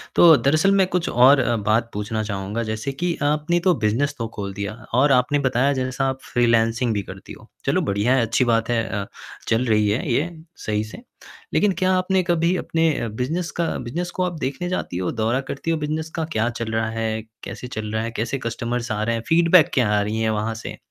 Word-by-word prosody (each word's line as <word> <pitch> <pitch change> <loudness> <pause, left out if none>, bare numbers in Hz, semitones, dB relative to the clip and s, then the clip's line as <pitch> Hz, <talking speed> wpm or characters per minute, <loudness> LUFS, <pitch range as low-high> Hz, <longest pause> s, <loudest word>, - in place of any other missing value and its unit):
तो 165 -2 +8
दरअसल 155 +8 +3
मैं 190 -1 +4
कुछ 180 -2 -1
और 130 +4 +6
अ, 120 -2 +1
बात 110 +2 +1
पूछना 110 +1 -2
चाहूँगा 100 +2 -3
जैसे 110 +4 -3
कि 170 +5 -2
आपने 150 +4 +1
तो 180 +1 +3
बिज़नेस 135 +6 0
तो 115 -1 -3
खोल 100 -2 -4
दिया 100 +1 -4 0.2
और 135 +4 +4
आपने 130 +3 +3
बताया 130 +1 +2
जैसा 130 0 -1
आप 130 0 -4
फ्रीलानसिंग 115 0 +2
भी 100 - -1
करती - - -10
हो। - - -15 0.2
चलो - - +2
बढ़िया 100 +5 +1
है, 130 - +3
अच्छी 115 +3 +1
बात 115 -1 +1
है 115 -1 +1 0.2
अ, - - -9 0.4
चल 115 +2 +2
रही 105 -3 +2
है 110 +9 -1
ये 150 +8 +1 0.4
सही 105 -1 0
से, 110 - -10 0.5
लेकिन 210 - +3
क्या 185 0 +2
आपने 185 0 +1
कभी 170 0 +1
अपने 165 -1 +1
अ, - - -2
बिज़नेस 135 +11 -3
का 170 - +2
बिज़नेस 170 +9 -4
को 185 - -2
आप 175 -3 -3
देखने 140 +7 -3
जाती 180 - -3
हो, 90 -1 -1
दौरा 115 +3 0
करती 150 +4 -3
हो 165 - +1
बिज़नेस 155 +1 -3
का, 165 -2 -1
क्या 120 -7 -1
चल 115 -2 -4
रहा 110 0 0
है, 110 -1 -2 0.2
कैसे 125 - -7
चल 110 -3 -5
रहा 110 0 0
है, 115 - -3
कैसे 115 +3 -2
कस्टमर्स 120 +1 -3
आ 105 -1 -1
रहे 115 +1 0
हैं, 115 - -3
फ़ीडबैक 170 0 +5
क्या 125 -5 +2
आ - - +2
रही 105 +2 -2
है 110 - +1
वहाँ 110 +1 -1
से? 110 - -7
120 Hz, 225 wpm, -22 LUFS, 110-155 Hz, 0.5 s, तो